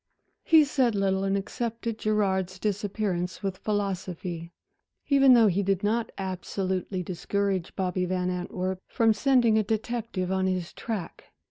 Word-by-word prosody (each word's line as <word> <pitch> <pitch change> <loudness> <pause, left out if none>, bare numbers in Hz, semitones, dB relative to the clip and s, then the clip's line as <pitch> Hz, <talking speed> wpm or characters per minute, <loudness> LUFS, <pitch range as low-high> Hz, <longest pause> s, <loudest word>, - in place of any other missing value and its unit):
He 320 -2 +6
said 260 -6 +1
little 195 -1 +1
and 195 0 +1
accepted 230 +2 -4
Gerard's 190 -4 0
disappearance 200 -2 -2
with 195 -1 -3
philosophy, 185 -4 -3 0.6
even 275 -2 +7
though 230 -2 +6
he 200 -1 +2
did 195 -1 0
not 225 +2 0
absolutely 185 0 -3
discourage 190 +1 -2
Bobby 185 -1 -1
Van 180 0 -1
Antwerp 180 +1 -3
from 225 -3 +3
sending 235 -1 +3
a - - +2
detective 220 -3 -2
on 190 0 +1
his 185 -2 -2
track. 215 -7 -5
195 Hz, 135 wpm, -27 LUFS, 185-220 Hz, 0.6 s, even